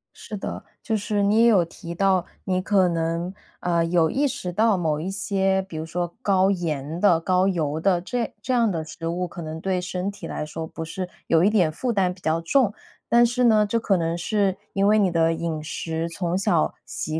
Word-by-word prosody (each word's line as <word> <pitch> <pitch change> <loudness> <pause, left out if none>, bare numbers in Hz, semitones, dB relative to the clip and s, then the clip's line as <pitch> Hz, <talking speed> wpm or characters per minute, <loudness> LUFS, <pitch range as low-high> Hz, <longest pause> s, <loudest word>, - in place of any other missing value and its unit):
是 215 - -8
的， - - -5 0.2
就 220 -2 0
是 205 0 -1
你 210 +3 +4
也 - - +6
有 200 -7 +5
提 170 0 -9
到， 190 0 +2 0.2
你 185 -1 0
可 190 -2 +3
能， 170 +2 -1 0.3
呃， 170 -1 +1
有 165 -1 +2
意 285 +2 +1
识 180 -7 -4
到 215 +3 +3
某 155 -3 0
一 180 +4 -3
些 195 -1 0
比 180 -4 -9
如 160 - -4
说 175 +1 -3
高 195 -2 +3
盐 160 -3 -3
的、 180 -5 +4
高 185 +2 +2
油 160 -5 -1
的， 180 0 +2
这 235 +5 -3
这 255 - -1
样 230 -4 +3
的 160 -2 -2
食 160 +1 -7
物 175 +2 -2
可 170 - -9
能 160 0 -6
对 190 -1 0
身 180 +2 -3
体 205 - -9
来 150 - -4
说 160 +1 -5
不 160 - -7
是 180 +3 -5 0.2
有 165 +1 +4
一 205 - +5
点 180 -8 +3
负 245 +10 -2
担 185 -3 +1
比 185 - -19
较 160 +1 0
重。 210 +4 +2 0.4
但 240 0 +6
是 245 +1 +1
呢， 215 -2 +5
这 230 +3 0
可 200 -3 +2
能 165 0 -1
是 195 +1 0 0.2
因 195 0 +2
为 215 +1 +5
你 195 -3 +3
的 165 -1 +2
饮 165 -2 -3
食 160 +1 -3
从 175 +1 -2
小 175 -5 +1
习 155 +4 -3
180 Hz, 235 characters per minute, -24 LUFS, 165-200 Hz, 0.4 s, 也